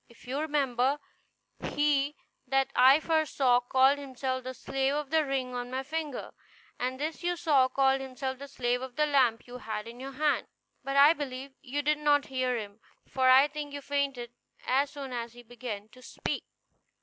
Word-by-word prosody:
If 235 - -18
you 265 +3 -2
remember, 280 -3 +1 0.6
he 290 0 +1 0.3
that 270 0 +1
I 265 +4 +7
first 315 -1 0
saw 250 -3 +5
called 265 +3 +3
himself 260 -1 -3
the 255 +1 -6
slave 270 +3 -1
of 295 -2 -3
the 320 -1 +4
ring 265 -3 -2
on 245 0 -4
my 260 +1 -3
finger; 300 -1 -4 0.5
and 255 +1 -2
this 310 +2 -3
you 350 0 0
saw 290 -6 +3
called 270 0 +2
himself 260 0 -5
the 280 - -8
slave 245 -2 -1
of 260 -1 -7
the 300 - +3
lamp 260 -6 +2
you 250 0 -9
had 215 -1 -5
in 235 +1 -10
your 270 +1 -7
hand; 295 +2 +1 0.4
but 275 +1 -2
I 290 +3 +8
believe 270 -3 -6
you 285 +1 -3
did 300 +1 +2
not 290 -1 +3
hear 255 -1 0
him, 205 -1 -7 0.3
for 260 -1 +2
I 265 +2 +7
think 295 -1 -6
you 285 - -5
fainted 275 -4 -2 0.3
as 275 +2 +2
soon 275 -3 -7
as 235 -1 -4
he 245 0 -13
began 225 -3 -7
to 255 +3 -17
speak." - - -4
270 Hz, 190 wpm, -29 LUFS, 250-285 Hz, 0.6 s, I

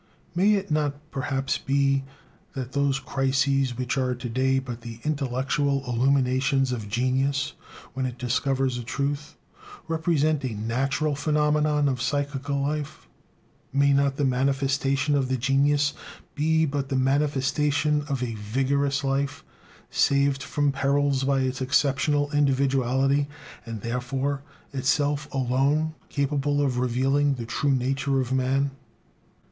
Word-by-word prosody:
May 200 +4 +4
it 195 -4 -3
not 150 -2 +1 0.2
perhaps 135 0 -1
be 135 0 +1 0.5
that 130 -1 -5
those 140 -1 +1
"crises," 135 -1 0
which 130 +2 -1
are 125 -1 0
to 120 0 -6
day 130 +3 +1
but 125 -3 -4
the 115 -1 -8
intellectual 140 -1 0
illuminations 130 +1 +2
of 110 -4 -4
genius 135 +4 0 0.4
when 130 0 -1
it 125 -1 -7
discovers 130 +1 0
a - - -5
truth, 140 +4 -3 0.5
represent 155 -2 +1
a 125 -4 -3
natural 135 +7 -1
phenomenon 150 0 +2
of 130 -3 -1
psychical 140 0 -1
life? 150 +2 -3 0.6
May 140 +1 +3
not 140 0 +2
the 145 - 0
manifestation 135 +2 +1
of 140 -2 +2
the 130 0 0
genius 140 +3 +2 0.4
be 160 +1 +2
but 140 -2 -2
the 135 - -1
manifestation 145 +2 +1
of 135 -3 -1
a 120 -2 -3
"vigorous 135 +6 0
life," 140 +1 -1 0.5
saved 140 0 +2
from 145 0 0
perils 140 0 +1
by 135 -1 +2
its 130 +1 -2
exceptional 145 +2 +1
individuality, 135 -1 +2 0.4
and 115 -2 -5
therefore 130 +4 -2 0.3
itself 145 +2 0
alone 140 +4 +1 0.2
capable 145 0 0
of 135 -4 +1
revealing 135 +3 +2
the 120 -2 -5
true 140 +5 -1
nature 135 +2 0
of 130 0 -1
man? 135 +2 +1
135 Hz, 130 wpm, -25 LUFS, 130-145 Hz, 0.6 s, May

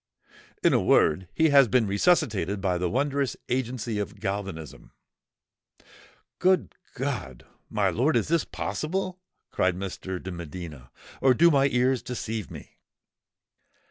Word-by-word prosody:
"In - - +5
a - - +3
word, 85 +4 +3
he 160 0 +3
has 140 -3 +6
been 120 0 +3
resuscitated 100 - +1
by 95 -2 0
the 90 0 0
wondrous 140 +2 0
agency 120 -3 -2
of 105 - -5
galvanism." 95 -6 -5 1.5
"Good 185 0 +2 0.2
God! 120 - -4 0.2
my - - +1
lord—is 140 +7 +1
this 165 0 +2
possible?" 185 +3 -3 0.3
cried 95 -1 +1
Mr. 95 -1 -5
de 95 - -7
Medina: 85 -6 -8 0.3
"or 130 -1 +5
do 170 +6 +6
my 140 -2 +4
ears 125 -1 +1
deceive 115 -3 -4
me?" - - -12
115 Hz, 125 wpm, -26 LUFS, 95-140 Hz, 1.5 s, has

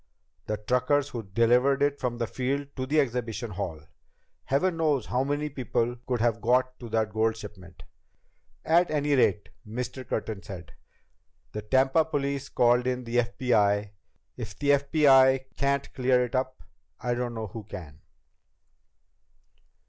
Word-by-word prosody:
The 105 - -1
truckers 125 +6 +1
who 120 - -5
delivered 120 +7 +2
it 145 0 +1
from 120 -2 -2
the 120 - -1
field 135 +4 -2
to 130 -1 -3
the 155 +3 +2
exhibition 120 -4 -2
hall. 90 -5 -4 0.6
Heaven 165 +6 +1
knows 150 -7 +1
how 125 +1 0
many 145 +2 -1
people 120 -3 -1
could 125 -2 0
have 115 -1 +1
got 125 +2 +1
to 120 - -8
that 110 -1 0
gold 110 0 +1
shipment." 95 -5 -11 0.8
"At 170 +2 +4
any 150 -1 +1
rate," 115 -6 +2 0.2
Mr. 125 +3 -5
Curtin 105 -3 -3
said, 90 -6 -9 0.8
"the 105 - -5
Tampa 135 +7 +3
police 140 -2 -2
called 120 +1 +3
in 125 0 -1
the 120 0 -2
FBI. 110 -4 +1 0.5
If - - -7
the 145 0 +2
FBI 135 -2 +5
can't 140 0 -1
clear 125 -1 +2
it 120 - -10
up, 130 0 -2 0.4
I 120 0 -1
don't 120 -1 -3
know 110 -1 -3
who 105 +1 -8
can." 80 -8 -9
125 Hz, 150 wpm, -27 LUFS, 110-140 Hz, 0.8 s, FBI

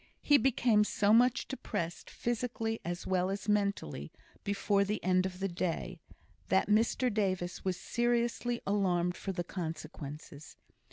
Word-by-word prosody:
He 290 -1 +6
became 235 -5 +3
so 210 0 +2
much 245 +2 +4
depressed, 175 -10 -4
physically 230 -1 -2
as 175 +1 -4
well 185 0 +1
as 200 +1 -4
mentally, 200 - 0 0.3
before 200 0 +1
the 210 +2 -2
end 185 0 +3
of 185 -1 -8
the 195 - 0
day, 180 0 -3 0.5
that 190 - +3
Mr 225 +3 +2
Davis 185 -4 -1
was 185 -2 -1
seriously 240 0 0
alarmed 180 -3 +1
for 195 - -4
the 175 -2 -3
consequences. 160 -3 -7
195 Hz, 135 wpm, -32 LUFS, 175-225 Hz, 0.5 s, He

